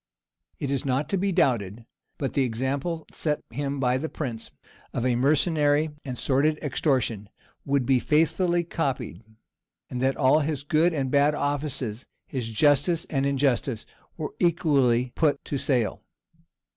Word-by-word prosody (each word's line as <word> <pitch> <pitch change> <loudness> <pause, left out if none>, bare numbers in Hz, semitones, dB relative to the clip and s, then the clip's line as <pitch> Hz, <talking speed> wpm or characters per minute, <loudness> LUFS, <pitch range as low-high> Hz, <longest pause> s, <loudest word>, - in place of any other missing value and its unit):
[*] - - -60
It 140 - -2
is 135 -2 0
not 135 +2 0
to 195 - +1
be 195 +1 0
doubted 115 - +1 0.3
but 135 - -3
the 140 - +2
example 135 +7 -2
set 150 -2 -2
him 140 +3 -3
by 125 -1 +2
the 160 +3 -3
prince, 120 -7 -5 0.4
of 120 - -1
a 125 -2 +2
mercenary 150 +2 +2
and 130 -3 -5
sordid 145 +5 +2
extortion, 120 -7 0 0.4
would 140 -2 +1
be 130 0 +3
faithfully 165 +5 +2
copied; 130 - -3 0.7
and 125 - -3
that 135 +1 +1
all 140 +2 +4
his 145 -2 -2
good 155 +4 +3
and 135 -5 -2
bad 145 +1 +4
offices, 140 -6 -2 0.2
his 125 -4 -4
justice 145 +8 +2
and 140 -2 +1
injustice, 135 -4 0 0.3
were 155 -3 -4
equally 135 -8 +2
put 150 -3 +1
to 140 - -3
sale. 125 -7 0
140 Hz, 150 wpm, -26 LUFS, 125-150 Hz, 0.7 s, all